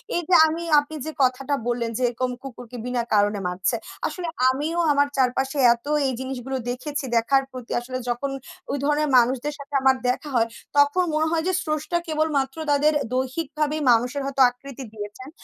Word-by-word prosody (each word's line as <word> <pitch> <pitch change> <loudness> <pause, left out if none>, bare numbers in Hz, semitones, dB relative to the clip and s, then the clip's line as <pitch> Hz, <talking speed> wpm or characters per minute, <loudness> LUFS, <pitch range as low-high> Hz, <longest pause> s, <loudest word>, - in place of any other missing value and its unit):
এই 345 - +1
যে - - +3
আমি 325 +2 -3 0.2
আপনি 290 +2 -6
যে 315 - -3
কথাটা 260 +2 0
বললেন, 240 -1 -1
যে - - -4
এরকম 250 +1 -2
কুকুরকে 245 -2 -9
বিনা 250 -1 -1
কারণে 205 0 +3
মারছে। 180 +6 -1 0.3
আসলে 360 -2 -5 0.2
আমিও 300 +6 -1
আমার 285 0 +3
চারপাশে 265 +2 +1 0.2
এত 235 +3 -13 0.2
এই - - 0
জিনিসগুলো 260 0 -4
দেখেছি 275 +4 -3
দেখার 270 +4 +3
প্রতি 255 -2 -9
আসলে 255 +1 -5
যখন 245 +4 -1 0.4
ওই 280 - -1
ধরনের 295 0 +1
মানুষদের 255 +4 +2
সাথে 280 +1 -11
আমার 265 0 +5
দেখা 275 +4 -2
হয়, 230 -1 +3 0.3
তখন 285 +6 +4
মনে 310 +1 +2
হয় 325 -1 +1
যে 375 - +1
স্রষ্টা 310 +2 -1
কেবলমাত্র 305 -3 0
তাদের 295 +2 +3 0.2
দৈহিকভাবেই 300 +3 -1
মানুষের 245 +5 +2
হয়তো 275 0 -1
আকৃতি 270 +1 -10
দিয়েছেন। 210 +5 -8
270 Hz, 170 wpm, -24 LUFS, 245-295 Hz, 0.4 s, আমার